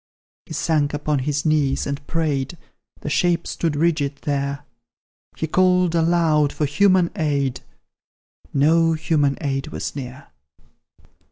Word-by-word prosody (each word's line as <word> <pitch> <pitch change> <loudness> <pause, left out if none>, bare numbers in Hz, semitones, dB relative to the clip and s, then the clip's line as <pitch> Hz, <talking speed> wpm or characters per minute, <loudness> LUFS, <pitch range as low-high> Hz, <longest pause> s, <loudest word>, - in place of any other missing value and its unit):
He - - -8
sank 150 -2 0
upon 150 -1 -1
his 145 +3 -2
knees 150 -3 +1
and 140 0 -5
prayed 150 -2 -1 0.4
The - - -4
shape 175 +2 +1
stood 165 -3 -2
rigid 150 -3 +1
there; 140 0 -2 0.7
He - - -1
called 180 +1 +3
aloud 165 -3 +2
for 150 - -1
human 180 +4 +3
aid, 140 - -1 0.9
No 165 +3 +3
human 155 -3 +1
aid 135 -2 -2
was - - -5
near. 130 0 -7
150 Hz, 120 wpm, -22 LUFS, 140-165 Hz, 0.9 s, called